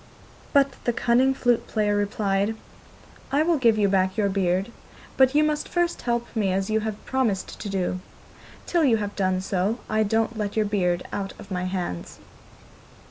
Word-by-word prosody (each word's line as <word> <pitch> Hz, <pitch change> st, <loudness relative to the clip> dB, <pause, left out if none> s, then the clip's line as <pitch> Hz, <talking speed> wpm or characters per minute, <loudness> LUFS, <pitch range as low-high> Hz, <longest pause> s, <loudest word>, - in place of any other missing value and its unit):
But 275 Hz, -2 st, +2 dB
the 240 Hz, -, +2 dB
cunning 245 Hz, +3 st, +3 dB
flute 245 Hz, -3 st, +1 dB
player 210 Hz, -2 st, +1 dB
replied: 205 Hz, 0 st, 0 dB, 0.8 s
'I 285 Hz, +3 st, +3 dB
will 330 Hz, -2 st, +2 dB
give 230 Hz, -4 st, +4 dB
you 205 Hz, -1 st, +3 dB
back 190 Hz, 0 st, +1 dB
your 205 Hz, -2 st, +2 dB
beard, 190 Hz, +2 st, 0 dB, 0.4 s
but 265 Hz, +1 st, +4 dB
you 300 Hz, -, +5 dB
must 300 Hz, -1 st, -1 dB
first 345 Hz, -1 st, 0 dB
help 235 Hz, -1 st, -1 dB
me 205 Hz, -4 st, +1 dB
as 195 Hz, +2 st, -1 dB
you 220 Hz, -, +3 dB
have 220 Hz, -1 st, -5 dB
promised 245 Hz, -8 st, -1 dB
to 205 Hz, -, -5 dB
do. 185 Hz, -1 st, -1 dB, 0.7 s
Till 345 Hz, -2 st, +1 dB
you 245 Hz, -6 st, +4 dB
have 205 Hz, -1 st, -4 dB
done 185 Hz, -2 st, 0 dB
so, 195 Hz, +4 st, 0 dB
I 215 Hz, 0 st, +1 dB
don't 225 Hz, +1 st, 0 dB
let 205 Hz, -1 st, -2 dB
your 215 Hz, -1 st, +2 dB
beard 180 Hz, -4 st, 0 dB
out 195 Hz, -1 st, -3 dB
of 195 Hz, -, -13 dB
my 180 Hz, -1 st, -2 dB
hands. 180 Hz, -, -4 dB
210 Hz, 180 wpm, -25 LUFS, 195-240 Hz, 0.8 s, you